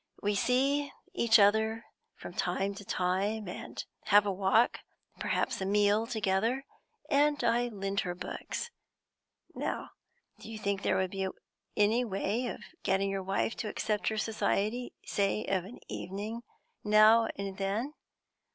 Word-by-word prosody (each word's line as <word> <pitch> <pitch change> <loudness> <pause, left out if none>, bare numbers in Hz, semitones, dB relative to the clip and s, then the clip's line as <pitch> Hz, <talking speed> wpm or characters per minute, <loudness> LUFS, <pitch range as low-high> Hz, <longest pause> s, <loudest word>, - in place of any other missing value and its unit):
We 205 +1 0
see 275 +6 +2 0.2
each 235 -9 +5
other 220 +2 +3 0.3
from - - -9
time 195 +1 -1
to 200 - -9
time, 195 +3 -1
and 180 - -6 0.2
have 205 0 +6
a 200 - +1
walk, 195 +5 +3 0.4
perhaps - - -1
a - - 0
meal, 205 +2 +3
together, 225 +3 0 0.4
and 290 -1 +3
I 240 +1 +3
lend 195 -3 -2
her 180 -1 -2
books. 185 - -5 0.8
Now, - - -3 0.5
do - - -10
you 220 - -5
think 200 -2 -1
there - - +1
would 190 -1 0
be 195 -1 -1 0.5
any 215 +4 +4
way 220 +3 -1
of - - -5 0.2
getting 195 +1 +1
your 195 0 -2
wife 195 +4 -1
to 215 - -3
accept 210 0 -1
her 220 - +1
society, 215 +2 -1
say 200 +1 0
of 185 -2 0
an 225 +6 -10
evening 205 +5 -5 0.4
now 215 +2 +6
and 195 -1 -5
then? 210 +9 -1
210 Hz, 145 wpm, -31 LUFS, 195-230 Hz, 0.8 s, have